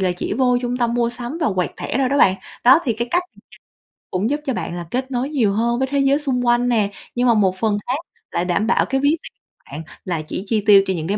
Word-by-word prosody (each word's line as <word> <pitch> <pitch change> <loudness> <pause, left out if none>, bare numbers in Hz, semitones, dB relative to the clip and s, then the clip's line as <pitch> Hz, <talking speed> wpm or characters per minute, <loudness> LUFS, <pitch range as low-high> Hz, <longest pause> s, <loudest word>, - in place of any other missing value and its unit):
là 185 -2 +1
chỉ - - -3
vô 250 -2 +3
trung 245 0 -2
tâm 240 -1 0
mua 235 -1 +1
sắm 245 +5 -6
và 315 - +1
quẹt 180 -1 0
thẻ - - -3
thôi 265 -2 +2
đó 280 +2 +1
bạn. 190 - +5 0.3
Đó, 260 +5 +8
thì 245 - +1
cái 235 +2 -4
cách 355 +4 +2 0.9
cũng 190 +5 0
giúp 290 +2 0
cho 265 - -1
bạn 175 - -4
là 175 - -6
kết 260 +2 -2
nối 255 +2 -1
nhiều 240 -10 +1
hơn 235 +3 0
với 265 - 0
thế 280 - +1
giới 275 +1 +3
xung 260 -4 -1
quanh 240 +1 +2
nè, 215 -4 +2 0.3
nhưng 250 +1 +2
mà 235 - +5
một 195 -4 +2
phần 215 -1 +1
khác 255 - 0 0.3
lại 175 - -1
đảm 185 +4 0
bảo 235 - +3
cái 270 0 -1
ví 285 - +3
tiền - - -11 0.4
bạn 150 +3 -6 0.2
là 175 -4 -2
chỉ 155 +4 -6
chi 215 -1 0
tiêu 205 -2 +7
cho 190 - +1
những 160 -3 -4
cái 200 +3 0
240 Hz, 275 wpm, -20 LUFS, 200-260 Hz, 0.9 s, Đó